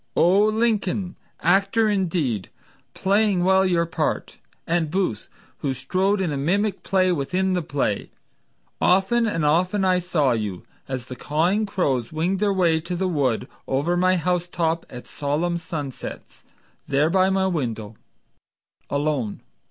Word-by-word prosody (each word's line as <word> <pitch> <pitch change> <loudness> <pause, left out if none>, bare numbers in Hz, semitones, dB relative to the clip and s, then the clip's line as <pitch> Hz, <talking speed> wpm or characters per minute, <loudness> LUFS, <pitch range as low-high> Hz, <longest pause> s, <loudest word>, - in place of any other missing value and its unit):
O 190 +5 +5
Lincoln, 215 -4 0 0.3
actor 195 +5 +3
indeed, 165 - 0 0.5
playing 200 -2 +2
well 190 +1 +4
your 175 -3 +2
part 165 - -2 0.3
And 165 -2 0
Booth, 180 - -1 0.3
who 135 -2 -2
strode 185 - 0
in 180 -5 0
a 145 - -2
mimic 195 +9 0
play 185 -1 +2
within 180 +5 0
the 180 - +1
play, 140 -9 -2 0.7
Often 195 +6 +3
and 165 -7 -1
often 180 +6 +2
I 185 -1 +3
saw 165 -7 +1
you, 105 -6 -2 0.2
As 130 -2 -4
the 130 - -8
cawing 175 - 0
crows 135 - -1
winged 170 +5 0
their 205 -1 +2
way 175 -4 +2
to 175 +2 -4
the 190 +2 0
wood 140 -9 0 0.2
Over 145 +7 0
my 185 +1 +3
house—top 175 -1 -1
at 125 -1 -9
solemn 160 +4 -1
sunsets, 150 -6 -7 0.4
There 145 +3 +2
by 190 +1 +4
my 190 0 +1
window, 115 - -3 0.9
Alone. 140 -7 -1
175 Hz, 140 wpm, -23 LUFS, 145-190 Hz, 0.9 s, O